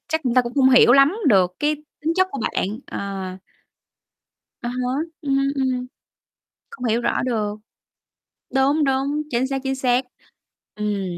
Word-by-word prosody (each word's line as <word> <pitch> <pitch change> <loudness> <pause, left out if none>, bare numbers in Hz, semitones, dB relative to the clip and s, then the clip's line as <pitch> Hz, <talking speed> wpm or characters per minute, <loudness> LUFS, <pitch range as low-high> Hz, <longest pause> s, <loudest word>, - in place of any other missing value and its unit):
chắc 320 +2 -1
người 250 -4 0
ta 255 - +5
cũng 240 0 -6
không 265 -2 +5
hiểu 245 -1 +7
lắm 275 +6 +6
được 185 -4 +3
cái 300 +1 +1 0.2
tính 315 +2 0
chất 370 0 +3
của 275 - -5
bạn, 210 +4 -1
ờ. 195 -2 -5 1.3
Ờ 240 - -3
hở, 250 0 -2 0.3
ừm, 275 -1 +1
ừm. 260 -2 -1 0.8
Không 250 - -9
hiểu 230 0 +1
rõ 235 - 0
được. 215 -5 -1 1.0
Đúng, 280 +3 +3
đúng, 275 +2 0
chính 245 +2 +1
xác, 270 0 -2
chính 270 0 -1
xác. 255 -1 +1 0.7
Ừm, 210 -2 -2
255 Hz, 155 wpm, -22 LUFS, 235-275 Hz, 1.3 s, hiểu